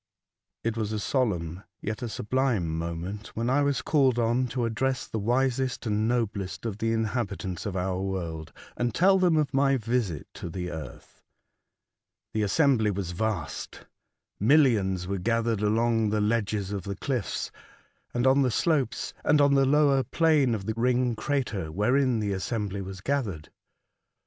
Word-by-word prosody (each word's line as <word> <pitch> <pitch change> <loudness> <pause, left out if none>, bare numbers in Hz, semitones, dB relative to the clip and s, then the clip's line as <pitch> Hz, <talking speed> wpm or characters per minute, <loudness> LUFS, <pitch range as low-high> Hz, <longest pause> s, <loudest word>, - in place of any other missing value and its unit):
IT 115 -1 -1
was 110 -2 -2
a 110 - -1
solemn 90 - -1 0.2
yet 105 +4 -4
a 120 - -3
sublime 110 -8 0
moment 85 +6 -4
when 115 +2 0
I 145 +2 +3
was 140 -2 +1
called 135 -5 +3
on 120 +2 +2
to 120 0 -1
address 130 +3 -1
the 110 - -4
wisest 130 +3 0
and 110 0 +1
noblest 110 -5 -2
of 110 -2 -3
the 115 0 0
inhabitants 105 -6 -2
of 100 - -4
our 95 0 -1
world, 85 -5 -4 0.2
and 120 -2 -1
tell 190 +2 +5
them 175 -3 +3
of 150 -3 0
my 135 0 +3
visit 115 - -1
to 85 - -7
the 90 +1 -4
earth. 80 -1 -9 1.1
The 110 - 0
assembly 110 +1 +3
was 95 -3 -3
vast, 90 -3 -3 0.5
millions 105 - +3
were 100 +1 -2
gathered 115 +2 0
along 115 +1 +2
the 105 +1 0
ledges 105 -2 0
of 100 -1 -2
the 100 +2 -5
cliffs, 120 +2 -2 0.6
and 120 +1 0
on 135 +1 +5
the 130 - +3
slopes, 135 -1 0
and 150 0 +4
on 140 -1 +5
the 135 -1 +4
lower 140 -1 +4
plain 145 -2 +2
of 100 -3 -6
the 110 - -1
ring 125 0 +1
crater 110 - -2
wherein 125 - +2
the 105 -2 -1
assembly 100 0 -3
was 95 0 -7
gathered. 105 - -2
115 Hz, 160 wpm, -27 LUFS, 100-130 Hz, 1.1 s, tell